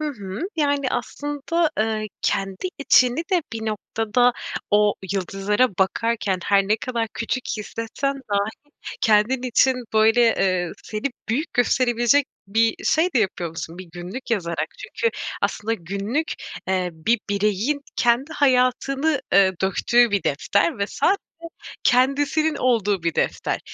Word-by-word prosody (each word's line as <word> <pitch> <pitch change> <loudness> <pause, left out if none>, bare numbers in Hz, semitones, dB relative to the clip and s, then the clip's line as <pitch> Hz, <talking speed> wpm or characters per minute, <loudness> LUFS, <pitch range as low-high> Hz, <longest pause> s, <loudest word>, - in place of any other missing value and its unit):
Hı 305 - -1
hı. 200 -7 -7 0.2
Yani, 285 -3 +1
aslında, 290 +6 -1
eee, 215 0 0 0.2
kendi 195 - -1
içini 255 -3 +4
de 360 -3 +3
bir 225 -1 -4
noktada 225 +3 +1 0.4
o 210 0 +4 0.2
yıldızlara 195 +5 +1
bakarken 205 0 0
her 200 -1 +3
ne 215 - +3
kadar 230 -1 -3
küçük 245 +3 -2
hissetsen 230 +6 -3 0.2
dahi 200 +1 +1 0.5
kendin 220 +4 +3
için, 255 +1 +3 0.2
böyle, 220 +2 +4
eee, 185 -6 +2
seni 215 +5 -3 0.2
büyük 300 +9 -1
gösterebilecek 245 +2 +3 0.2
bir 225 +2 +2
şey 320 +3 +2
de - - +4
yapıyormuşsun 170 -5 -3
bir 185 - -7
günlük 185 +9 -7
yazarak. 170 -7 -1
Çünkü 465 - -2 0.3
aslında 225 +2 0
günlük, 200 - -3 0.4
eee, 185 -1 0
bir 165 +9 +1
bireyin 210 +8 0 0.2
kendi 245 +6 +2
hayatını, 275 +2 +2
eee, 195 -1 +5
döktüğü 235 +5 +3
bir 200 -1 +1
defter 200 - +1
ve 200 - 0
sadece 390 - +1 0.7
kendisinin 285 +5 +2
olduğu 210 -9 +1
bir 165 -2 -1
defter - - -1
225 Hz, 130 wpm, -23 LUFS, 200-260 Hz, 0.7 s, eee